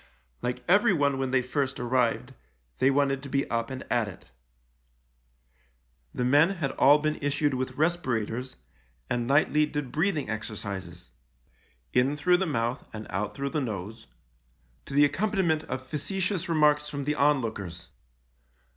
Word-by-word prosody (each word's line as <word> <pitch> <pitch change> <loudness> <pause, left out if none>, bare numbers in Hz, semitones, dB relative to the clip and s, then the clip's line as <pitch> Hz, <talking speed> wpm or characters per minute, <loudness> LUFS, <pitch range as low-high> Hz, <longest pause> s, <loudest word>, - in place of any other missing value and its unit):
Like 125 0 -3
everyone 170 - +3
when 135 -1 -1
they 130 -1 +2
first 135 +1 -2
arrived, 125 +1 0 0.5
they 130 - +4
wanted 135 -1 +1
to 140 - -9
be 140 0 0
up 115 0 -1
and 130 -1 -6
at 115 -3 +2
it. 95 - -10 1.9
The 125 - -2
men 150 +9 +4
had 145 -6 -2
all 145 +2 +6
been 155 0 -1
issued 145 0 +1
with 130 0 -2
respirators, 130 -7 -1 0.6
and 120 -1 0
nightly 150 +2 +3
did 145 -4 -4
breathing 160 -3 0
exer 110 0 -4
cises 90 -7 -7 0.4
— - - -38
in 130 +4 +2
through 180 +4 +4
the 190 0 -1
mouth 120 -2 -1
and 110 -1 -7
out 100 +2 -2
through 140 0 -3
the 150 - 0
nose 110 -1 -5 0.4
— - - -38
to 140 - -6
the 145 +1 +7
accompaniment 170 0 0
of 130 0 -5
facetious 180 +6 -2
remarks 150 -2 +3
from 140 -1 -4
the 150 +2 0
onlookers. 110 - -1
135 Hz, 155 wpm, -27 LUFS, 120-150 Hz, 1.9 s, the